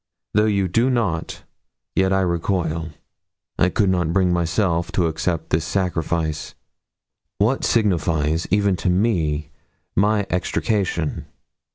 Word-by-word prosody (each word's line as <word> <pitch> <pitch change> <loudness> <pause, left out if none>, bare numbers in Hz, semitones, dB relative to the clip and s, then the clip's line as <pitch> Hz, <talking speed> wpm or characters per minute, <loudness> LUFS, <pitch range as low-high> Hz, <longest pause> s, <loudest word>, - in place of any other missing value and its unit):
Though 105 +1 +3
you 100 -3 +1
do 115 +8 +2
not, 105 -11 -1 0.5
yet 95 0 +2
I 95 0 +3
recoil. 85 -2 -1 0.7
I 90 - +4
could 95 +1 +2
not 85 -3 0
bring 90 -2 +3
myself 85 0 0
to 90 - +2
accept 80 0 -2
this 80 0 +2
sacrifice. 80 -3 -2 0.8
What 115 +7 +1
signifies, 80 -7 +1
even 100 0 +2
to 90 - -1
me, 90 -6 0 0.4
my 105 +1 +2
extrication? 90 -3 -1
90 Hz, 120 wpm, -22 LUFS, 80-100 Hz, 0.8 s, I